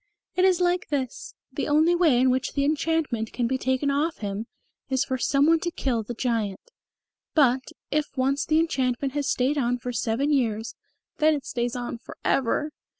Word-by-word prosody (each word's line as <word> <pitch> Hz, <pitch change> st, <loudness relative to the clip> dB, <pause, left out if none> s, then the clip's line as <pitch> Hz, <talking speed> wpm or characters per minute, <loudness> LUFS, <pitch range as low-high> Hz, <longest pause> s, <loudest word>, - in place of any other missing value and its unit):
"It 365 Hz, -, +4 dB
is 370 Hz, -2 st, +4 dB
like 355 Hz, 0 st, +1 dB
this. 265 Hz, -4 st, -3 dB, 0.2 s
The -, -, -2 dB
only 310 Hz, +3 st, +4 dB
way 330 Hz, -8 st, +4 dB
in 255 Hz, 0 st, +4 dB
which 260 Hz, +1 st, -1 dB
the 280 Hz, -1 st, +1 dB
enchantment 300 Hz, -7 st, 0 dB
can 245 Hz, -, 0 dB
be 260 Hz, +2 st, 0 dB
taken 260 Hz, +2 st, 0 dB
off 305 Hz, +4 st, 0 dB
him 205 Hz, +1 st, -4 dB, 0.4 s
is 265 Hz, 0 st, +1 dB
for 260 Hz, -1 st, -2 dB
some 275 Hz, +2 st, +3 dB
one 330 Hz, +1 st, +4 dB
to 345 Hz, -, -2 dB
kill 255 Hz, -8 st, -1 dB
the 235 Hz, +3 st, -6 dB
Giant. 225 Hz, -, -2 dB, 0.6 s
But, 265 Hz, -4 st, +4 dB, 0.3 s
if 300 Hz, 0 st, +1 dB
once 270 Hz, +2 st, +1 dB
the 310 Hz, -, +2 dB
enchantment 265 Hz, -4 st, 0 dB
has 290 Hz, -1 st, -1 dB
stayed 270 Hz, +4 st, +1 dB
on 245 Hz, -1 st, +1 dB
for 245 Hz, 0 st, -5 dB
seven 235 Hz, +6 st, 0 dB
years, 225 Hz, -4 st, 0 dB, 0.5 s
then 310 Hz, 0 st, +4 dB
it 280 Hz, -, -6 dB
stays 240 Hz, 0 st, -2 dB
on 240 Hz, -1 st, -4 dB
for -, -, -12 dB
ever." 275 Hz, +4 st, +1 dB
265 Hz, 190 wpm, -25 LUFS, 245-300 Hz, 0.6 s, It